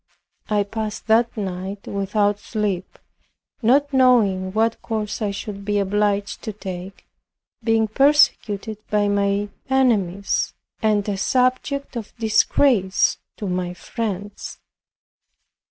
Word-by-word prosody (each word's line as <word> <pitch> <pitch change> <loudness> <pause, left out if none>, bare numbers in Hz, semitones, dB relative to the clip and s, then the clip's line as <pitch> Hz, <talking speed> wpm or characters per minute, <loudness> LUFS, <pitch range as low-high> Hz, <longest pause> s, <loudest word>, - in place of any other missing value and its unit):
I 210 -1 +2
passed 215 +1 -5
that 230 +1 +3
night 190 0 -4
without 205 +1 0
sleep, 205 -5 -3 0.6
not 280 +5 +3
knowing 215 -8 +4
what 225 +2 +1
course 215 -1 -3
I 210 - 0
should 200 0 -6
be 205 0 0
obliged 205 0 0
to 220 - -4
take, 190 -1 -8 0.6
being 225 -1 +2
persecuted 220 -5 +2
by 210 -1 +2
my 200 0 +1 0.2
enemies, 205 -8 +1 0.3
and 210 -2 +2
a 200 -2 -1
subject 255 +5 0
of 230 -1 -7
disgrace 220 -2 +3 0.2
to 205 - -4
my 180 -1 -2
friends. 205 -1 -5
210 Hz, 110 wpm, -22 LUFS, 200-225 Hz, 0.6 s, knowing